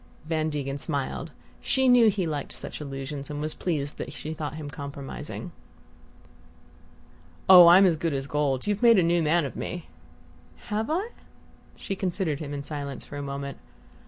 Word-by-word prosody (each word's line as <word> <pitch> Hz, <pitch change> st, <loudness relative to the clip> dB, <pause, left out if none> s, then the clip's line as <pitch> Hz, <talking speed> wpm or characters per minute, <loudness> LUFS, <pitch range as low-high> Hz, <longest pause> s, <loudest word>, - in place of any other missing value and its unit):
Van 155 Hz, 0 st, 0 dB
Degen 140 Hz, -2 st, -3 dB
smiled. 140 Hz, -3 st, -3 dB, 0.3 s
She 265 Hz, -1 st, +2 dB
knew 245 Hz, -3 st, +7 dB
he 195 Hz, -3 st, -1 dB
liked 150 Hz, -3 st, -3 dB
such -, -, -6 dB
allusions, 140 Hz, 0 st, -6 dB
and 145 Hz, -1 st, -4 dB
was 155 Hz, +1 st, -3 dB
pleased 150 Hz, -5 st, -3 dB
that -, -, -5 dB
she 155 Hz, -, -6 dB
thought 150 Hz, -2 st, -5 dB
him 155 Hz, -2 st, -6 dB
compromising. 145 Hz, +4 st, -7 dB, 2.0 s
"Oh, 180 Hz, -2 st, +10 dB
I'm 185 Hz, +3 st, +8 dB
as 170 Hz, -4 st, +3 dB
good 160 Hz, -2 st, -1 dB
as 135 Hz, 0 st, -2 dB
gold. 140 Hz, -3 st, 0 dB
You've 205 Hz, 0 st, -1 dB
made 235 Hz, -2 st, +7 dB
a 185 Hz, -, +5 dB
new 170 Hz, +1 st, +2 dB
man 160 Hz, +1 st, +2 dB
of 135 Hz, -, -6 dB
me!" 175 Hz, -2 st, -5 dB, 0.8 s
"Have 215 Hz, +4 st, -1 dB
I?" 370 Hz, +8 st, -1 dB, 0.7 s
She 195 Hz, -, -5 dB
considered 180 Hz, -5 st, -1 dB
him 145 Hz, -2 st, -6 dB
in 140 Hz, -1 st, -4 dB
silence 140 Hz, -2 st, -6 dB
for -, -, -10 dB
a -, -, -4 dB
moment. 140 Hz, 0 st, -5 dB
155 Hz, 170 wpm, -26 LUFS, 140-180 Hz, 2.0 s, Oh